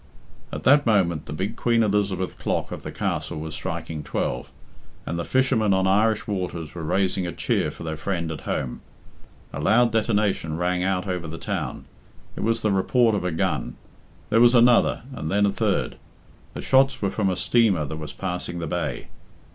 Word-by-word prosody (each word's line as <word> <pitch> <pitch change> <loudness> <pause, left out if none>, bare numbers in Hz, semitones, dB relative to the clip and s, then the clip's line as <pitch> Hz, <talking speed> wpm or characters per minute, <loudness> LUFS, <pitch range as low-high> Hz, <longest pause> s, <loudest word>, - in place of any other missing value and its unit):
At - - -5
that 145 0 +5
moment 85 -8 +2
the - - -6
big 95 +9 -3
Queen 115 -1 +2
Elizabeth 100 -4 0
clock - - -2
of - - -6
the - - -6
Castle - - -3
was 80 0 -6
striking 80 -2 -4
twelve, 60 -3 -3 0.5
and 85 +1 -3
the - - -1
fishermen 120 -6 +2
on 95 0 +2
Irish 105 +3 +2
waters 90 -6 -4
were 85 - -6
raising 95 +2 0
a - - -3
cheer - - 0
for - - -9
their 80 -1 -3
friend 85 0 -2
at 75 - -6
home. 65 -2 -2 0.7
A - - -4
loud 115 +3 +4
detonation 105 -7 0
rang 90 +1 0
out 95 0 0
over 90 -3 -3
the 80 +1 -6
town. - - -4 0.5
It - - -5
was 115 +1 +1
the 105 - +2
report 115 +4 +3
of 105 - -1
a 90 - -1
gun. 80 - -1 0.6
There 115 - +5
was 120 +1 +6
another, 120 0 +5
and 80 -10 -4
then 100 +1 +3
a 100 - +2
third. - - -1 0.6
The - - -4
shots 135 0 +3
were 100 - +1
from 100 -3 0
a 90 - 0
steamer 100 -8 +2
that 75 +3 -5
was 75 -1 -6
passing 90 -2 -4
the 85 - -3
bay. 85 +1 -3
95 Hz, 190 wpm, -24 LUFS, 85-110 Hz, 0.7 s, was